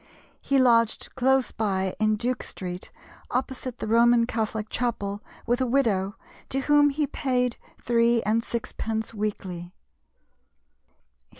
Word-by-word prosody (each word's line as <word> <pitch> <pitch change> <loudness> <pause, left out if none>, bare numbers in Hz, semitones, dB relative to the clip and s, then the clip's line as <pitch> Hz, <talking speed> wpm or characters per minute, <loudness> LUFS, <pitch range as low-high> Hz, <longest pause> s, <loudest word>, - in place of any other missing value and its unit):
He 275 - +1
lodged 230 -3 +3
close 265 0 +2
by 190 -3 -1
in 215 0 +3
Duke 245 +4 -1
Street, 180 -1 -7 0.4
opposite 255 -1 -3
the - - -4
Roman 235 +1 +5
Catholic 220 -2 -2
Chapel, 210 -4 -2 0.2
with 240 +2 +1
a 260 - +2
widow, 210 -7 +1 0.3
to 270 - 0
whom 290 +1 +5
he 295 +1 0
paid 250 -3 -1 0.2
three 235 -1 +2
and 220 +3 +1
sixpence 225 -1 -3
weekly. 190 -5 -4
230 Hz, 120 wpm, -26 LUFS, 215-255 Hz, 0.4 s, Roman